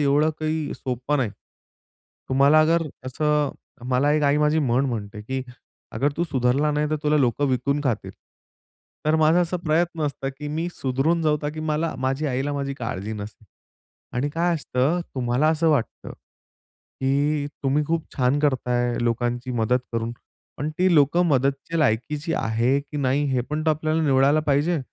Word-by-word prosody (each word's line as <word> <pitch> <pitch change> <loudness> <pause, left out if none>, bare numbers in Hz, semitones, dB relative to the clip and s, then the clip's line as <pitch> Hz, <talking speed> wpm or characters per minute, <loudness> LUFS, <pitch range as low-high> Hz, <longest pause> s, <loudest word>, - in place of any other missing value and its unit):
एवढं 145 +2 +3
काही 155 -1 -2
सोपं 130 +3 -2
नाही. 120 -5 0 1.0
तुम्हाला 140 +4 +5
अगर 165 +2 +3 0.2
असं 150 +2 +1 0.4
मला 140 +4 +3
एक 150 0 +2
आई 140 +1 +3
माझी 150 +1 +3
म्हण 130 -1 +2
म्हणते, 105 -3 -4
की 130 +4 -3 0.5
"अगर 140 +1 0
तू 170 - +1
सुधारला 135 +1 +1
नाही, 150 0 0
तर 155 - +1
तुला 150 0 +2
लोकं 135 +2 +2
विकून 135 +3 0
खातील." 120 -5 -1 1.0
तर 155 - +3
माझा 160 +2 +4
असा 175 +1 0
प्रयत्न 165 +1 +1
असतं 135 -1 -4
की 150 0 -5
मी 160 +3 -2
सुधरून 140 +6 0
जाऊ, 150 -1 +3
का 145 - -1
की 155 +1 -7
मला 155 +1 -1
माझी 135 +3 -1
आईला 135 +1 -1
माझी 140 -1 -3
काळजी 110 -5 -4
नसेल. 105 +1 -8 0.7
आणि 135 +4 0
काय 170 +3 +1
असतं 150 +2 0
तुम्हाला 130 +4 +1
असं 160 +1 +2
वाटतं, 135 -7 -2
की 145 +2 -4 0.2
तुम्ही 140 +2 +1
खूप 165 0 -1
छान 130 +1 +2
करता 130 -4 0
आहे, 120 0 0
लोकांची 120 +2 -1
मदत 120 +1 +2
करून. 115 0 -2 0.4
पण 150 +3 -3
ती 185 -1 +3
लोकं 155 +5 +4
मदतीच्या 140 +2 0
लायकीची 150 +4 0
आहे 115 +5 +1
की 145 +1 -9
नाही? 140 +1 +1
हे 125 - +2
पण 155 +1 -1
तो 155 - +5
आपल्याला 155 +1 0
निवडायला 140 +1 +4
पाहिजे. 150 +4 +2
145 Hz, 165 wpm, -24 LUFS, 130-155 Hz, 1.0 s, तुम्हाला